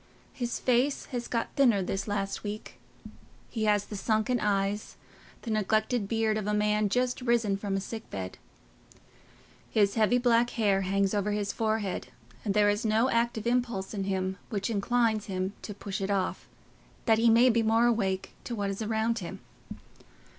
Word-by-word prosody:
His 240 -2 -3
face 255 +3 +1
has 240 -1 -3
got 230 -1 -2
thinner 240 -9 +4
this 195 +2 -3
last 200 -1 -2
week: 210 +1 -6 0.7
he 220 -2 -1
has 205 -1 +2
the 210 - -7
sunken 220 +4 +1
eyes, 205 0 -1 0.5
the 230 - -4
neglected 215 +1 +1
beard 220 0 +1
of 210 - -4
a 210 - +1
man 210 0 +2
just 250 +4 0
risen 235 -5 +2
from 195 0 -3
a - - +1
sick 220 +3 -7
bed. 95 -1 -6 1.3
His 200 -2 +3
heavy 225 +2 +3
black 240 -1 +3
hair 200 -4 +3
hangs 195 +1 +1
over 205 0 0
his 205 -1 -1
forehead, 215 - -1 0.4
and 200 - -1
there 210 -1 +5
is 205 +2 -2
no 225 +4 +2
active 230 -1 0
impulse 235 -5 0
in 195 -2 -2
him 190 -1 -2
which 205 +1 -2
inclines 220 0 +1
him 190 0 -2
to - - -7
push 200 -1 -5
it 195 - -2
off, 195 -2 -1 0.6
that 225 -1 +4
he 230 0 +5
may 240 +3 +6
be 230 0 +2
more 225 +1 +3
awake 195 -5 0
to 240 - -3
what 200 -2 -1
is 195 - -5
around 220 +1 0
him. 175 - -7
215 Hz, 175 wpm, -29 LUFS, 200-230 Hz, 1.3 s, may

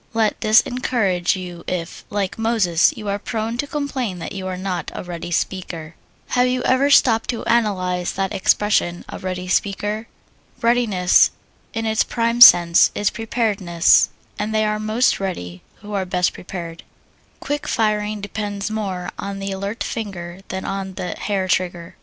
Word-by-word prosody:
Let 220 -2 +1
this 215 +1 +6
encourage 215 -9 0
you 175 -2 -7
if, 170 -2 -4
like 200 0 -2
Moses, 210 -7 +3
you 210 - -7
are 200 0 -1
prone 225 +2 -3
to 285 - -1
complain 270 -9 -3
that 170 - -6
you 190 -1 -5
are 185 -1 -4
not 185 -1 -3
a - - -5
ready 175 -1 -6
speaker. 170 -2 -3 0.4
Have 250 0 +3
you 250 0 -1
ever 265 +2 +3
stopped 230 -5 +4
to 235 - -3
analyze 185 -6 0
that 195 0 -2
expression, 190 -3 +1
"a - - -7
ready 185 -1 -4
speaker?" 205 +4 -1 0.5
Readiness, 230 -7 +4 0.5
in 225 0 -2
its 220 0 +2
prime 235 0 -1
sense, 170 -7 +9
is 205 - +1
preparedness, 205 -7 +2 0.3
and 215 +1 -2
they 215 0 +2
are 215 0 -1
most 215 +4 +1
ready 90 - -5 0.2
who 210 0 -8
are 195 -2 0
best 180 -1 0
prepared. 170 -2 -7 0.6
Quick 290 0 -3
firing 210 -1 0
depends 205 0 -4
more 190 -5 -3
on 200 0 -4
the 195 0 -4
alert 200 +4 -3
finger 185 -5 -5
than 190 0 -5
on 195 -1 -4
the 180 - -4
hair 195 -3 -2
trigger. 175 -2 -1
200 Hz, 160 wpm, -21 LUFS, 180-220 Hz, 0.6 s, sense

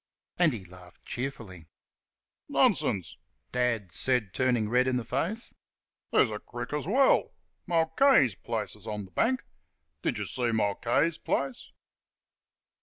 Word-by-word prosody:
And 175 -3 +5
he 100 -5 -7
laughed 90 0 -16
cheerfully. 110 - -6 0.8
"Nonsense!" 90 -7 +2 0.3
Dad 115 -6 0
snapped, 120 -1 0
turning 125 -4 +1
red 125 +3 +3
in 130 - +1
the 125 -2 -1
face; 185 - -2 0.6
"there's - - +4
a 105 - -4
crick 120 +5 -7
as 150 +1 -2
well. 260 +7 +3 0.3
Mulcahy's 165 - +4
place 90 - -4
is - - -14
on 105 -2 -4
th' 95 - -19
bank. 255 +2 +1 0.6
Did - - -1
you - - -3
see 120 -2 -1
Mulcahy's 115 +9 +1
place?" 135 -2 -2
125 Hz, 130 wpm, -29 LUFS, 105-150 Hz, 0.8 s, And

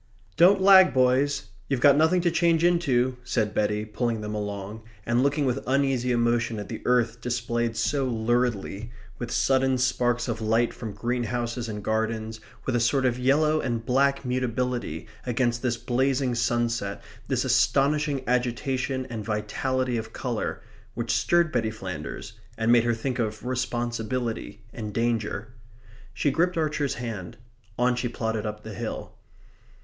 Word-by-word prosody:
"Don't 185 +5 +6
lag, 190 -3 +7
boys. 130 +3 +2 0.2
You've 135 -3 +1
got 140 +3 +6
nothing 160 +4 +3
to 170 -1 +2
change 170 -1 +2
into," 130 -8 +2
said 110 -4 -1
Betty, 105 0 0
pulling 115 +1 -2
them 105 0 -4
along, 105 0 -5 0.2
and 120 +1 +2
looking 140 +2 +1
with 130 +1 -1
uneasy 130 -2 +1
emotion 120 -1 +1
at 105 - -6
the 110 - -6
earth 120 -2 +2
displayed 120 -1 -1
so 140 -2 +1
luridly, 115 -2 -1 0.3
with 120 - -4
sudden 130 +1 +2
sparks 120 -1 +1
of 115 -2 -3
light 115 +2 +2
from 110 -3 -6
greenhouses 120 +1 -2
in 105 -1 -5
gardens, 110 0 -2 0.3
with 130 - 0
a - - +3
sort 130 +3 +2
of 125 -1 +1
yellow 150 +4 +3
and 115 -3 -2
black 140 +2 +2
mutability, 125 -7 -2 0.2
against 120 -1 0
this 120 -2 0
blazing 130 +1 0
sunset, 120 -3 -1 0.2
this - - 0
astonishing 145 0 +2
agitation 130 +2 -1
and 110 -2 -4
vitality 120 +4 -1
of 110 0 -6
colour, 120 -4 -3 0.3
which 115 -1 -2
stirred 170 -2 +2
Betty 115 -3 0
Flanders 95 -2 -6 0.2
and 110 +1 +2
made 120 -1 +5
her 120 -1 +2
think 125 +2 -3
of 110 0 -2
responsibility 120 -3 -3
and 105 -3 -6
danger. 115 -2 -1 0.6
She 145 - 0
gripped 175 +4 +1
Archer's 150 -3 0
hand. 115 -2 -6 0.4
On 125 +1 +2
she 120 0 -2
plodded 110 -2 -2
up 105 0 -6
the 110 - -7
hill. - - -5
120 Hz, 150 wpm, -26 LUFS, 110-130 Hz, 0.6 s, lag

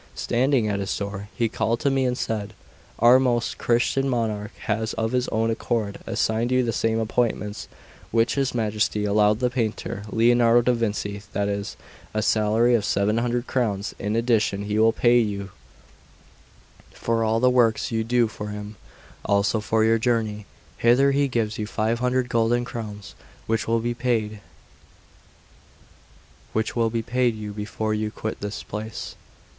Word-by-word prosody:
Standing 125 -1 +1
at 100 -1 -1
his 100 - -2
door, 100 0 -5
he 115 - +1
called 115 +1 -1
to 140 - +2
me 135 -1 +1
and 125 -1 0
said: 105 -2 -3 0.4
"Our 120 +3 +6
most 120 -3 0
Christian 125 +3 +1
monarch 110 -4 -2
has 110 +1 -1
of 110 0 -1
his 125 0 0
own 115 +1 0
accord 110 -2 -2
assigned 115 +2 0
you 130 0 +3
the 115 -1 -1
same 115 0 0
appointments 110 -2 -1 0.4
which 115 0 +2
his 135 -3 -1
Majesty 105 -2 0
allowed 105 +1 +3
the 125 -1 +1
painter 110 -4 -2
Lionardo 120 +1 +4
da 125 - +3
Vinci, 105 -3 -2
that 100 0 0
is, 100 0 -4 0.4
a 110 - +1
salary 110 +3 +3
of 115 -3 +2
seven 105 +2 +1
hundred 120 +1 -1
crowns; 110 -6 -1
in 105 +2 -2
addition, 115 -4 +1
he 105 +1 -1
will 110 +1 +5
pay 120 +1 +4
you 100 -3 -2 1.4
for 115 0 -1
all 110 +1 +1
the 125 +1 +4
works 120 -3 +2
you 110 -1 0
do 120 +1 +2
for 105 -1 -7
him; 105 0 -7 0.5
also 100 +2 +2
for 110 +1 +1
your 115 +1 +3
journey 110 -3 -1 0.3
hither 130 +4 +4
he 140 +1 +2
gives 110 -4 -2
you 105 - -2
five 110 +1 -1
hundred 125 0 +1
golden 120 +1 +1
crowns, 105 -4 -7 0.3
which 115 0 -1
will 115 0 +2
be 120 +1 -1
paid 115 -4 -1 2.1
you 115 0 0
before 105 +1 -3
you 110 0 -1
quit 110 0 -5
this 105 0 -5
place." 110 +1 -6
115 Hz, 155 wpm, -24 LUFS, 105-120 Hz, 2.1 s, Our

